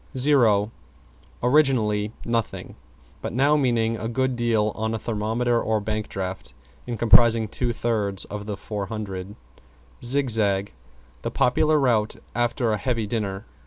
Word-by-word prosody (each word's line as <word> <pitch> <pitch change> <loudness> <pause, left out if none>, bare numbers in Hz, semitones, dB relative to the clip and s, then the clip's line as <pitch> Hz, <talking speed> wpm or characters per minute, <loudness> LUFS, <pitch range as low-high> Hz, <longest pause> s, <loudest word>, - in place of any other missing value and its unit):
=ZERO= 115 -7 +4 0.7
Originally, 120 -7 +2
nothing; 115 -2 -2 0.5
but - - -4
now 140 +5 +3
meaning 115 -5 +1
a 110 - -4
good 130 +2 0
deal 115 -3 +1
on 110 +1 -2
a - - -1
thermometer 115 +2 0
or 110 0 0
bank 105 +1 -3
draft, 95 -1 -5 0.3
and 120 -2 -3
comprising 115 -1 +5
two 120 +3 -2
thirds 105 -5 -1
of 105 0 -7
the 105 -2 -4
400. 100 -2 -5 0.7
=ZIGZAG= 110 -7 +1 0.5
The - - -2
popular 155 +5 +2
route 115 -6 +1 0.2
after 120 0 0
a 105 - -1
heavy 115 -4 -1
dinner. 100 -3 -3
115 Hz, 130 wpm, -24 LUFS, 105-120 Hz, 0.7 s, comprising